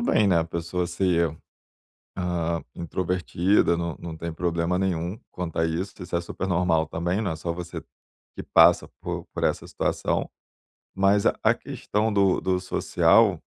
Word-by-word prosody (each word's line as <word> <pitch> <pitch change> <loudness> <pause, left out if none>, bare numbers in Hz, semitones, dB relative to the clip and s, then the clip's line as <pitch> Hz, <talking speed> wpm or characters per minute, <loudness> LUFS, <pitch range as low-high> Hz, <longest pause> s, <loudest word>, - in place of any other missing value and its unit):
bem, 175 - +3
né, 90 -3 +4
a 80 - +1
pessoa 85 +2 -3
ser, 85 -3 +1 0.8
hã, 85 -2 -1
introvertida, 90 +1 +1
não 85 -1 -3
não 85 -2 -6
tem 85 +1 -5
problema 85 +1 -1
nenhum 90 +1 -1
quanto 90 -3 -5
a 80 - +3
isso, 85 +4 -2
isso 90 -1 -3
é - - +1
super 90 +2 -5
normal 85 -3 +2
também, 85 +5 -1
não 95 - -1
é 80 - -3
só 85 +1 -3
você 85 0 -6 0.6
que - - -5
passa - - +5
por - - -4
por - - -3
essa - - 0
situação. - - -1 0.7
Mas 100 +1 +3
a - - +3
a - - +5
questão 105 +1 -2
do 100 -2 +3
do 95 -1 0
social 95 +2 +3
90 Hz, 165 wpm, -25 LUFS, 85-95 Hz, 0.8 s, passa